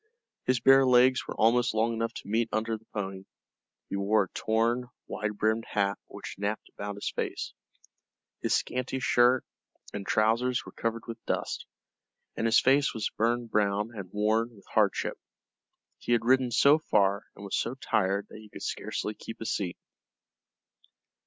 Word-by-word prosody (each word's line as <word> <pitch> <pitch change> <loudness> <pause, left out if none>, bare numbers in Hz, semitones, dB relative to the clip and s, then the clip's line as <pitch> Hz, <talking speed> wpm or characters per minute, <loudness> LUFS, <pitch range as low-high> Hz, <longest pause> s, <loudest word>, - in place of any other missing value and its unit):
His 130 -1 +3
bare 135 +3 +7
legs 130 0 +4
were - - -5
almost 115 +1 +3
long 115 +2 +2
enough 115 0 -1
to - - -8
meet 115 +2 +1
under 110 +1 0
the 110 +1 -13
pony; 95 -2 -5 0.6
he - - -4
wore 100 +2 +3
a 95 - -9
torn 115 +3 0 0.2
wide 105 -1 -4
brimmed 110 +2 +1
hat 100 -1 +1
which - - -8
napped 105 +2 -2
about 100 0 -6
his 100 - -4
face. - - -3 0.9
His - - +2
scanty 125 +1 -2
shirt 125 -1 +4 0.5
and 100 - -4
trousers 115 +5 +1
were - - -9
covered 115 0 -3
with 115 -1 -7
dust, - - -2 0.7
and 115 - 0
his 115 - +6
face 135 +1 +3
was 110 -2 -2
burned 120 +1 0
brown 105 +1 +1
and 95 -3 -7
worn 110 +3 +1
with 100 - -18
hardship. - - +1 0.8
He 120 - 0
had 115 -1 +2
ridden 130 0 +4
so 140 +6 +5
far 100 -7 +2
and 100 - -10
was 100 - -2
so 120 - -1
tired 100 -5 0
that - - -10
he 110 -1 -14
could - - -10
scarcely 105 - -3
keep 115 - -9
his 115 - -2
seat. 90 -3 -3
110 Hz, 165 wpm, -29 LUFS, 105-120 Hz, 0.9 s, bare